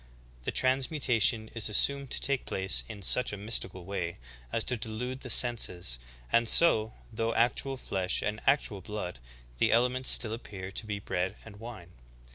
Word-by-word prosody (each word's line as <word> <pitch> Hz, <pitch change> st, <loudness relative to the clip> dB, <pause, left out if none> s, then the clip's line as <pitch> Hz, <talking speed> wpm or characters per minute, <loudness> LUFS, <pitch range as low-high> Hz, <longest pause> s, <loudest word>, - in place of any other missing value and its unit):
The -, -, -1 dB
transmutation 130 Hz, -4 st, +2 dB
is 110 Hz, -2 st, -1 dB
assumed 140 Hz, +5 st, +1 dB
to -, -, -1 dB
take 140 Hz, -1 st, 0 dB
place 95 Hz, 0 st, 0 dB
in 105 Hz, -3 st, -8 dB
such 125 Hz, +6 st, +3 dB
a 105 Hz, -, -5 dB
mystical 95 Hz, -3 st, -2 dB
way 85 Hz, -3 st, -4 dB, 0.3 s
as 115 Hz, -, 0 dB
to 125 Hz, -, 0 dB
delude 120 Hz, +3 st, -5 dB
the 130 Hz, -, -8 dB
senses; 90 Hz, -, +2 dB, 0.3 s
and 115 Hz, -1 st, +4 dB
so, 110 Hz, -10 st, +4 dB, 0.2 s
though 115 Hz, +1 st, -1 dB
actual 130 Hz, +3 st, +1 dB
flesh 95 Hz, -6 st, -1 dB
and 105 Hz, +1 st, -3 dB
actual 105 Hz, -9 st, +2 dB
blood, 90 Hz, -, -6 dB, 0.4 s
the -, -, +3 dB
elements 125 Hz, +3 st, +2 dB
still 110 Hz, -2 st, +5 dB
appear 95 Hz, -5 st, -7 dB
to 110 Hz, -, -3 dB
be 105 Hz, -1 st, -2 dB
bread 90 Hz, -2 st, -3 dB
and 105 Hz, -2 st, -12 dB
wine. 110 Hz, -7 st, -10 dB
110 Hz, 165 wpm, -29 LUFS, 100-125 Hz, 0.4 s, still